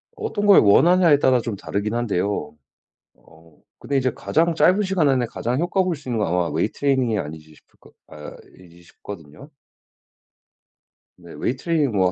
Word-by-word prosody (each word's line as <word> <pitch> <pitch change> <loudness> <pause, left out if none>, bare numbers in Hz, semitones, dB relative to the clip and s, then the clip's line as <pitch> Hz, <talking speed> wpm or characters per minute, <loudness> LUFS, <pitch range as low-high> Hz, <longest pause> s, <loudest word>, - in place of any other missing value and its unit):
어떤 430 - -4
걸 200 - +7
원하냐에 165 - +4
따라 130 -4 +2
좀 115 -3 -5
다르긴 105 +3 -4
한데요. 100 -9 -2 0.6
어 80 -2 -22 0.2
근데 140 - -3
이제 130 -1 0
가장 165 +1 0
짧은 185 +5 +3
시간 185 -6 +1
안에 130 -3 +1
가장 120 +2 -3
효과 185 +2 0
볼 180 -3 -2
수 140 - -13
있는 120 -3 -2
건 105 - -1
아마 90 0 0
웨이트 80 +8 -2
트레이닝이 130 -6 +1
아니지 75 0 -8
싶을 - - -27
거 - - -20
아이지 85 +3 -14
싶거든요? 85 -4 -12 1.7
네 - - -14
웨이트 130 +2 -4
트레이닝이 160 -4 +1
뭐 95 -2 +2
120 Hz, 350 characters per minute, -21 LUFS, -, 1.7 s, 걸